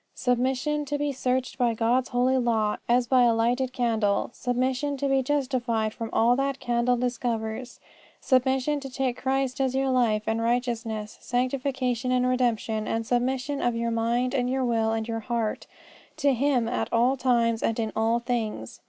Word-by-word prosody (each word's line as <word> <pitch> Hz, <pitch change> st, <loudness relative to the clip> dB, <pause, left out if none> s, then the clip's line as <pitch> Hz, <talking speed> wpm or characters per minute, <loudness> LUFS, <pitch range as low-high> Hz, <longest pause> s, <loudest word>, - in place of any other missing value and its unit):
Submission 265 Hz, +4 st, 0 dB
to 290 Hz, +1 st, -2 dB
be 290 Hz, 0 st, -1 dB
searched 255 Hz, -1 st, -2 dB
by 240 Hz, -2 st, +2 dB
God's 240 Hz, +3 st, +1 dB
holy 255 Hz, +2 st, +2 dB
law 220 Hz, -3 st, +1 dB
as 245 Hz, +1 st, +3 dB
by 255 Hz, +1 st, +4 dB
a 235 Hz, -2 st, +4 dB
lighted 245 Hz, +3 st, +1 dB
candle: 225 Hz, -5 st, 0 dB
submission 260 Hz, +4 st, -1 dB
to 280 Hz, +1 st, -1 dB
be 270 Hz, -1 st, +2 dB
justified 250 Hz, -5 st, -1 dB
from 225 Hz, 0 st, -5 dB
all 235 Hz, +2 st, +3 dB
that 275 Hz, +1 st, 0 dB
that -, -, -23 dB
candle 240 Hz, -1 st, +1 dB
discovers: 240 Hz, -1 st, -3 dB, 0.4 s
submission 265 Hz, +2 st, +1 dB
to 275 Hz, -1 st, -7 dB
take 260 Hz, -1 st, -1 dB
Christ 270 Hz, 0 st, 0 dB
as 260 Hz, -1 st, 0 dB
your 270 Hz, 0 st, +1 dB
life 230 Hz, -4 st, +2 dB
and 225 Hz, +1 st, -1 dB
righteousness, 230 Hz, -3 st, -2 dB
sanctification 255 Hz, -1 st, -1 dB
and 250 Hz, 0 st, +2 dB
redemption: 235 Hz, -4 st, 0 dB
and 225 Hz, 0 st, -1 dB
submission 260 Hz, +4 st, -1 dB
of 240 Hz, -1 st, +1 dB
your 230 Hz, 0 st, -1 dB
mind 235 Hz, +2 st, 0 dB
and 250 Hz, -2 st, 0 dB
your 260 Hz, 0 st, 0 dB
will 225 Hz, -2 st, +1 dB
and 225 Hz, 0 st, -2 dB
your 225 Hz, -1 st, -2 dB
heart 230 Hz, -2 st, -3 dB, 0.5 s
to 285 Hz, -3 st, +3 dB
Him 255 Hz, -2 st, +1 dB
at 245 Hz, -, -2 dB
all 240 Hz, +3 st, +3 dB
times 235 Hz, -3 st, +1 dB
and 225 Hz, -, 0 dB
in 220 Hz, -1 st, -1 dB
all 225 Hz, +1 st, +2 dB
things. 225 Hz, -, -3 dB
245 Hz, 175 wpm, -26 LUFS, 230-260 Hz, 0.5 s, by